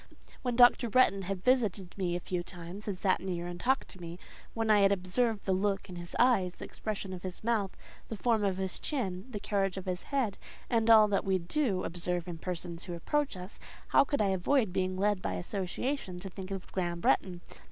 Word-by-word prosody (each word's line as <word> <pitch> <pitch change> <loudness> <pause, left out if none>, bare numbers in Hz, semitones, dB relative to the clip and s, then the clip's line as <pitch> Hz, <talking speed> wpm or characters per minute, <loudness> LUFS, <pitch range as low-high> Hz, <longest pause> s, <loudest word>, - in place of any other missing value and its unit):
When 245 -2 -1
Dr. 245 -1 +6
Bretton 210 -4 +4
had 190 0 -4
visited 215 -8 +1
me 180 -3 -1
a - - -1
few 180 0 -3
times, 175 +3 -9
and 200 -3 -2
sat 190 0 +2
near 175 -2 -3
and 175 0 -6
talked 265 +5 +1
to 185 - -13
me; 170 0 -7 0.4
when 225 -1 +1
I 210 - +6
had 195 0 +5
observed 200 +4 0
the 190 - +1
look 195 +1 0
in 180 - -7
his 175 0 -7
eyes, 200 -8 +3
the - - -7
expression 205 -3 -4
about 180 - -6
his 185 +1 -6
mouth, 215 -4 0 0.3
the 225 - -3
form 225 -1 +2
of 195 -2 +1
his 190 -1 -2
chin, 200 -9 -3
the 215 -5 -5
carriage 195 -2 0
of 190 - -5
his 180 -1 -2
head, 260 -8 -1 0.3
and 230 -1 +2
all 220 -2 +8
that 200 - +1
we 190 -2 +2
do 190 - 0
observe 175 0 -2
in 170 -2 -6
persons 175 -1 -5
who 175 -2 -5
approach 285 - -1
us—how 185 +8 0
could 285 -2 0
I 200 - +2
avoid 195 +3 +2
being 185 0 0
led 205 0 +1
by 95 - -2
association 190 - -3
to 195 0 -7
think 190 0 -7
of 195 -2 -6
Graham 175 -2 -2
Bretton? 175 0 +1
190 Hz, 215 wpm, -31 LUFS, 180-220 Hz, 0.4 s, all